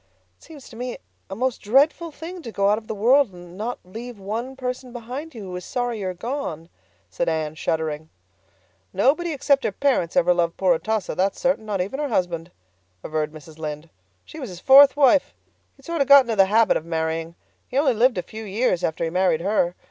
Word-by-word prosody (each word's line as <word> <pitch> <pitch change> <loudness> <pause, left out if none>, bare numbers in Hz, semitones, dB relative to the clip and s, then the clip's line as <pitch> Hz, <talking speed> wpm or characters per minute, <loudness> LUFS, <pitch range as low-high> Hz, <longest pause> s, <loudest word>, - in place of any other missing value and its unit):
"It - - -23
seems 295 -5 -13
to 230 - -13
me 245 +1 -5 0.3
a 195 - -5
most 255 +2 -1
dreadful 285 +9 +2
thing 335 +4 -8
to 235 - -8
go 200 -1 +1
out 210 - +2
of 220 - -21
the 220 - -4
world 245 +3 +4
and 175 0 -12
not 225 +5 -4
leave 230 +5 -9
one 225 +7 -5
person 255 -1 -5
behind 250 +6 -7
you 220 - -7
who 185 -2 -7
is 180 - -6
sorry 245 -3 -3
you 195 - -3
are 185 - -2
gone," 175 - -5 0.4
said 170 - -1
Anne, 155 -2 -2
shuddering. 160 -1 -3 0.8
"Nobody 285 - +2
except 280 -1 +2
her - - 0
parents 255 -5 0
ever 250 -10 +5
loved 170 -1 0
poor 185 -2 +3
Atossa, 215 +3 -2
that's 190 +1 0
certain, 265 -5 0
not 200 -3 -1
even 200 +10 -4
her 295 - -1
husband," 175 -5 -1 0.5
averred 155 -1 -2
Mrs. 155 0 -13
Lynde. 155 +1 -6 0.3
"She 315 - -11
was 260 -6 -6
his 180 -2 -9
fourth 275 +5 +7
wife. 280 0 +4 0.4
He'd 275 - -21
sort 335 -3 -2
of 275 - +2
got 280 -1 +9
into 235 -2 -2
the 195 -2 +6
habit 220 +3 +3
of - - -6
marrying. 165 0 -3 0.3
He 255 - -4
only 280 -2 +3
lived 240 0 +3
a 180 - -1
few 220 0 -9
years 210 -2 0
after 160 +1 -1
he 165 - -1
married 180 -2 +2
her. 180 -2 +1
215 Hz, 215 wpm, -23 LUFS, 175-265 Hz, 0.8 s, got